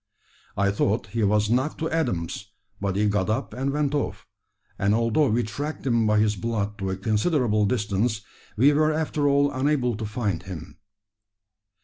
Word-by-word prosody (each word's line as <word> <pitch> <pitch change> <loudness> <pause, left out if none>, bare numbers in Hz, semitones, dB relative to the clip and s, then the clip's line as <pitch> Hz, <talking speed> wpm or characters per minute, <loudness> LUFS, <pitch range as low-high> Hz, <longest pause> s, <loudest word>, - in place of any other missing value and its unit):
I 100 0 +2
thought 100 +2 0
he 115 -1 0
was 105 +1 +2
knocked 130 +5 +1
to 160 - -2
atoms, 100 - -2 0.3
but 100 -1 -1
he 105 +2 +2
got 100 -2 0
up 115 +6 -2
and 135 +2 -2
went 145 0 0
off; 145 - -2 0.5
and 100 +2 +2
although 115 +5 +2
we 120 +2 +1
tracked 145 +9 -5
him 115 -4 +2
by 105 0 +3
his 105 0 +2
blood 105 0 -3
to 95 -1 -2
a 95 - -2
considerable 110 - +1
distance, 105 -1 0 0.4
we 140 +6 +5
were 155 +1 +3
after 155 -2 0
all 140 0 +3
unable 130 -3 +1
to 110 - -4
find 105 -5 -2
him!" 90 -2 -9
110 Hz, 170 wpm, -25 LUFS, 100-140 Hz, 0.5 s, we